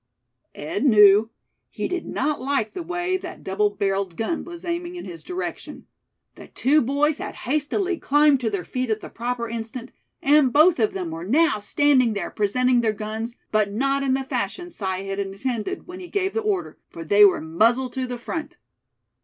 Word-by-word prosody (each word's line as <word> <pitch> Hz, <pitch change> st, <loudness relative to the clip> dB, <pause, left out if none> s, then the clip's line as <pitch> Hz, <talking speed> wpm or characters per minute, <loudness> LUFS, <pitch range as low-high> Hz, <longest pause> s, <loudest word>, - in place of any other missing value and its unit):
Ed 155 Hz, -, -3 dB
knew. 210 Hz, -4 st, +6 dB, 0.4 s
He -, -, -3 dB
did 360 Hz, -1 st, -4 dB
not 290 Hz, 0 st, -1 dB
like 260 Hz, -5 st, -1 dB
the 365 Hz, -, -6 dB
way 350 Hz, +2 st, -1 dB
that -, -, -9 dB
double 205 Hz, +2 st, +1 dB
barreled 195 Hz, -3 st, -2 dB
gun 275 Hz, +9 st, -2 dB
was 345 Hz, 0 st, -9 dB
aiming 345 Hz, +1 st, -3 dB
in 350 Hz, -, -7 dB
his 175 Hz, -4 st, -9 dB
direction. 365 Hz, +1 st, -6 dB, 0.5 s
The -, -, -13 dB
two 295 Hz, +4 st, +2 dB
boys 285 Hz, +4 st, +1 dB
had -, -, -6 dB
hastily 305 Hz, -, 0 dB
climbed 295 Hz, -1 st, +4 dB
to 235 Hz, -3 st, -1 dB
their 200 Hz, -4 st, -3 dB
feet 255 Hz, +5 st, -3 dB
at 220 Hz, -1 st, -1 dB
the -, -, -9 dB
proper 240 Hz, 0 st, -3 dB
instant; 230 Hz, +2 st, -6 dB, 0.3 s
and 285 Hz, -2 st, +4 dB
both 310 Hz, +3 st, +5 dB
of 215 Hz, -2 st, +2 dB
them 180 Hz, -4 st, -4 dB
were 165 Hz, +1 st, -6 dB
now 270 Hz, -, +2 dB
standing 255 Hz, +2 st, +3 dB
there, 200 Hz, -4 st, -4 dB
presenting 245 Hz, +4 st, +2 dB
their 220 Hz, -2 st, +1 dB
guns, 220 Hz, +3 st, -5 dB, 0.2 s
but 215 Hz, -2 st, +2 dB
not 275 Hz, +6 st, 0 dB
in 265 Hz, -1 st, +1 dB
the 270 Hz, -, -2 dB
fashion 350 Hz, +6 st, -3 dB
Si 215 Hz, -, -9 dB, 0.2 s
had 195 Hz, 0 st, -3 dB
intended 215 Hz, -, -3 dB
when 365 Hz, +1 st, -9 dB
he 360 Hz, -, -8 dB
gave 390 Hz, +1 st, -1 dB
the 450 Hz, -, 0 dB
order, 415 Hz, -3 st, -2 dB
for 165 Hz, -, -8 dB
they 205 Hz, +6 st, +6 dB
were 200 Hz, -, +6 dB
"muzzle 230 Hz, +11 st, +1 dB
to 260 Hz, 0 st, -3 dB
the 245 Hz, 0 st, -4 dB
front." 305 Hz, +6 st, -6 dB
250 Hz, 190 wpm, -23 LUFS, 210-305 Hz, 0.5 s, knew